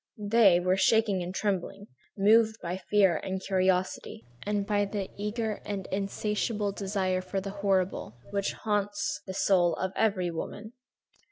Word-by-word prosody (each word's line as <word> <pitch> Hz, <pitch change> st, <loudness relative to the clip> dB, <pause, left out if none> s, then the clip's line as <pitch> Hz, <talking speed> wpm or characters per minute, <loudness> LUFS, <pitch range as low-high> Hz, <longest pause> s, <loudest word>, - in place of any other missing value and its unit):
They, 205 Hz, -3 st, +5 dB
were 185 Hz, +1 st, +1 dB
shaking 210 Hz, -2 st, +3 dB
and 175 Hz, +1 st, -4 dB
trembling, 195 Hz, 0 st, -2 dB, 0.3 s
moved 220 Hz, +2 st, +4 dB
by 175 Hz, +1 st, -4 dB
fear 195 Hz, -5 st, +4 dB
and 190 Hz, 0 st, -4 dB
curiosity, 185 Hz, -1 st, -1 dB, 0.2 s
and 205 Hz, -1 st, 0 dB
by 205 Hz, 0 st, +1 dB
the 200 Hz, -1 st, -4 dB
eager 210 Hz, +1 st, -3 dB
and 200 Hz, -2 st, -4 dB
insatiable 205 Hz, +2 st, -1 dB
desire 190 Hz, -2 st, -1 dB
for 185 Hz, +1 st, -3 dB
the 195 Hz, +1 st, -5 dB
horrible, 190 Hz, -, -1 dB
which 200 Hz, 0 st, -1 dB
haunts 205 Hz, -7 st, -2 dB
the 190 Hz, -, -5 dB
soul 180 Hz, -4 st, +3 dB
of 190 Hz, 0 st, -3 dB
every 190 Hz, -5 st, +1 dB
woman. 210 Hz, +7 st, -6 dB
195 Hz, 145 wpm, -28 LUFS, 185-210 Hz, 0.3 s, They